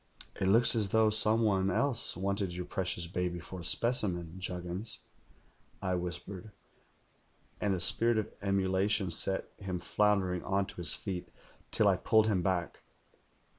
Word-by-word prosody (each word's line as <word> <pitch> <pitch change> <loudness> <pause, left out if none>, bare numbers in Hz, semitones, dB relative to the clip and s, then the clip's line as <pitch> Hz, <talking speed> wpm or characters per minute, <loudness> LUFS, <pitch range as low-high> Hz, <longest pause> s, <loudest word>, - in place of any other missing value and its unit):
"'It 95 - 0
looks 115 +5 +5
as 105 -3 0
though 110 +1 +4
some 110 +1 +4
one 95 -3 +2
else 125 +1 0
wanted 100 0 -1
your 90 0 -5
precious 90 -2 -3
baby 90 0 -2
for 90 +2 -9
a - - -8
specimen. 90 -7 0
Juggins,' 90 +3 -5 0.8
I 95 - -1
whispered; 90 +3 -5 1.1
and 100 -2 +1
a - - -3
spirit 115 +6 +2
of 110 - -2
emulation 95 0 +1
set 95 +3 0
him 95 -3 -4
floundering 95 -3 +1
on 95 0 0
to - - -10
his 85 -2 +1
feet, 95 -3 -5 0.4
till - - +3
I - - +4
pulled 110 -1 +3
him 105 -5 +1
back. 90 -2 -1
95 Hz, 150 wpm, -31 LUFS, 90-105 Hz, 1.1 s, looks